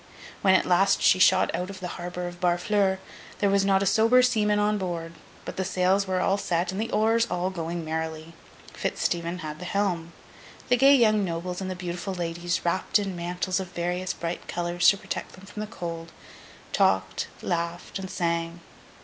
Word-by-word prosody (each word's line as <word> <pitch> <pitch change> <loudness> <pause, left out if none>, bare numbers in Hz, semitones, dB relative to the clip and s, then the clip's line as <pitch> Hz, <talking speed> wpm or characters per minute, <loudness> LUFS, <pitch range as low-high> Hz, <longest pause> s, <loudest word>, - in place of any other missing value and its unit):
When, 190 -1 +5
at - - +3
last, 190 +2 +3
she 185 - +5
shot 185 0 +4
out 180 +1 -3
of 200 - -8
the 180 -1 -5
harbour 180 0 -5
of 175 0 -9
Barfleur, 190 +2 +2 0.4
there 200 -1 +2
was 200 0 +3
not 195 0 +3
a - - 0
sober 225 +6 +5
seaman 215 -4 +2
on 210 0 +1
board. 170 -3 -4 0.3
But - - -7
the 190 - 0
sails 190 +1 +1
were 185 -1 0
all 195 +2 +1
set, 175 -1 0
and 190 +3 -3
the 225 - -2
oars 225 +2 +2
all 180 +1 -1
going 170 -1 -4
merrily. 160 0 -4 0.4
Fitz - - -3
Stephen 170 +1 -1
had 150 0 -6
the 180 - -7
helm. 180 -4 -1 0.6
The 250 - +4
gay 275 +3 +7
young 215 -5 +4
nobles 180 +1 -3
and 190 - -3
the 185 - -3
beautiful 180 +1 -4
ladies, 170 0 -2
wrapped 185 +4 +2
in 200 -3 -3
mantles 180 +2 -2
of 185 -1 -7
various 180 +2 -2
bright 170 +1 -5
colours 175 0 +2
to 200 - +3
protect - - -5
them 185 - -14
from 205 +2 -9
the 215 - -3
cold, 170 -5 -6 0.6
talked, 95 0 +1 0.2
laughed, 170 +2 -3
and 190 -1 -6
sang. 170 -1 -2
180 Hz, 190 wpm, -26 LUFS, 170-195 Hz, 0.6 s, gay